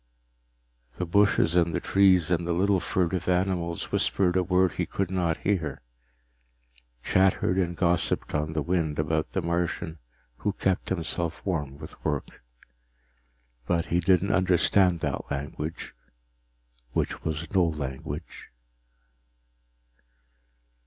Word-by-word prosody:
_The 90 - -2
bushes 100 -2 +3
and 85 -2 +3
the - - +1
trees 95 -4 +4
and 85 -1 +1
the 85 - +1
little 95 +2 +2
furtive 90 0 -1
animals 90 -2 0
whispered 90 -2 +1
a 95 - +4
word 90 0 +2
he - - -3
could 95 -2 -2
not 85 -3 0
hear, 85 -11 -2 1.2
chattered 95 -1 +2
and 85 -2 -1
gossiped 85 -2 0
on 75 +1 -1
the 80 -1 -1
wind 80 -2 0
about 80 0 -1
the 95 - -1
Martian 85 -1 -2 0.4
who 105 - -1
kept 95 -1 -1
himself 85 -2 -3
warm 75 -8 -2
with 75 +1 -12
work. 75 -2 -3 1.3
But 85 -1 +1
he 85 - +4
didn't 95 +3 +3
understand 90 -1 +3
that - - -3
language 75 +3 -5 1.0
which - - -2
was 80 +3 -4
no 95 -3 +4
language. 75 0 -5
85 Hz, 120 wpm, -27 LUFS, 80-95 Hz, 1.3 s, trees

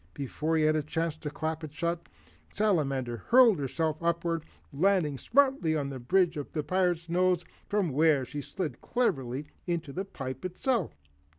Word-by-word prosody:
Before 155 +3 -1
he 155 - +3
had 155 0 +4
a 155 - +2
chance 160 +1 -2
to 150 - -5
clap 155 +2 -3
it 155 - -6
shut, 170 +2 -2 0.4
the - - -26
Salamander 135 - +1
hurled 230 - +5
herself 150 +4 -1
upward, 170 -1 0 0.3
landing 170 -2 +2
smartly 260 - +3
on 140 -2 -2
the 130 - -6
bridge 175 +6 +2
of 145 - -5
the 150 - -1
Pirate's 175 0 +1
nose, 180 0 +2 0.2
from 200 -6 +1
where 150 -1 +3
she 145 +4 -5
slid 155 -4 -5
cleverly 140 - -1 0.2
into 165 -5 -2
the 190 - -2
pipe 130 -9 -7
itself. 185 - -1
160 Hz, 170 wpm, -29 LUFS, 145-180 Hz, 0.4 s, hurled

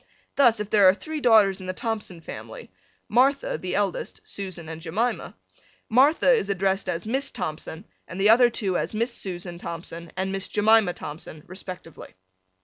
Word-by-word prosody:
Thus 240 -6 +5
if 210 0 -5
there 200 -3 +7
are 185 - +4
three 310 +6 -6
daughters 210 -6 +5
in 185 - -8
the 185 - -2
Thompson 210 -5 -4
family - - -9 0.4
Martha, 265 +5 +2
the 185 - -3
eldest, 200 -3 -2
Susan 185 -5 -6
and 160 0 -7
Jemina, 210 +9 -2 0.5
Martha 270 +4 +5
is 205 -5 0
addressed 195 0 0
as 170 +1 -3
Miss 265 +5 -1
Thompson 160 -2 -6 0.2
and 185 - -7
the 200 +2 +4
other 240 +1 +6
two 195 -6 -1
as - - -3
Miss 235 +3 0
Susan 175 -2 -6
Thompson 170 -1 -7
and 190 +1 -1
Miss 195 0 -3
Jemina 210 -3 +3
Thompson 150 0 -8
respectively. 180 - -10
195 Hz, 165 wpm, -25 LUFS, 180-225 Hz, 0.5 s, there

